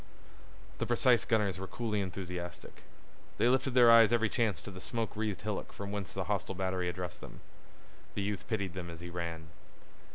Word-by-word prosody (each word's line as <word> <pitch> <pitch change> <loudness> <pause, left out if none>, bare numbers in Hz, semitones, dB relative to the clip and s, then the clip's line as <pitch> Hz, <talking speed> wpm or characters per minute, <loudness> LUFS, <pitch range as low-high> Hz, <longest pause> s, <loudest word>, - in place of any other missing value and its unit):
The - - -1
precise 120 0 +4
gunners 105 -5 +1
were 95 - -5
coolly 110 -2 -1
enthusiastic. 90 -2 -6 0.6
They 120 - +4
lifted 130 0 +2
their 120 -2 +8
eyes 115 -1 +8
every 115 -2 +3
chance 110 -8 +1
to 100 - -8
the 95 -1 -9
smoke 115 +1 -3
wreathed 105 -3 -2
hillock 105 -1 -3
from 100 0 -6
whence 100 -2 -4
the 95 - -2
hostile 95 0 -2
battery 95 -1 -1
addressed 90 0 -5
them. - - -10 0.8
The 100 - -1
youth 105 0 -3
pitied 100 -5 -1
them 90 -2 -5
as 85 0 -9
he 85 0 -7
ran. 85 -2 -5
100 Hz, 185 wpm, -32 LUFS, 90-110 Hz, 0.8 s, their